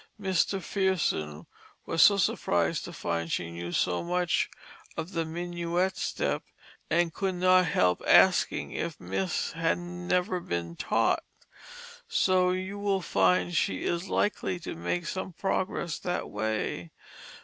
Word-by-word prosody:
Mr. 190 0 +1
Fearson 165 - -1 0.4
was 165 - +1
so 200 - +8
surprised 85 - +1
to - - -7
find 85 -1 -3
she 85 -1 -2
knew 85 +1 -6
so 90 0 +1
much 180 0 +1 0.5
of 165 - -4
the 165 -3 -1
Minuet 175 +2 -1
step, - - -1 0.5
and 170 -1 +2
could 190 -2 -1
not 185 0 +4
help 90 - +2
asking - - +4
if - - -4
Miss 95 +1 -2
had 165 0 0
never 180 +1 -1
been 85 - -4
taught. - - +1 0.9
So 185 -1 +3
you 185 +2 -3
will 200 -2 +1
find 90 - +2
she 95 - 0
is 175 +2 -2
likely 195 -3 0
to - - -5
make 90 - -2
some 185 +1 -4
progress 180 -2 -2
that 180 0 -3
way. 105 -5 -2
170 Hz, 135 wpm, -28 LUFS, -, 0.9 s, so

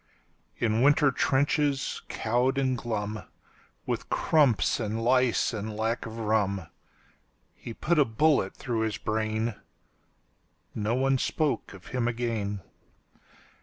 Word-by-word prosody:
In 110 0 +1
winter 145 +1 +5
trenches, 140 +2 +1
cowed 125 +4 0
and 130 -2 +1
glum, 110 -3 -3 0.6
With - - -3
crumps 135 - +2
and 110 -1 -2
lice 120 -7 +2
and 105 0 -4
lack 115 +2 -1
of 110 0 -8
rum, 105 -4 0 0.9
He 115 - -9
put 170 0 +1
a 145 - +6
bullet 115 -3 +2
through 120 -4 -3
his 110 -1 -1
brain.No 110 0 -5
one 135 0 +2
spoke 150 -9 -1
of 95 - -13
him 125 -2 0
again. 115 -4 -2
115 Hz, 115 wpm, -28 LUFS, 110-130 Hz, 0.9 s, a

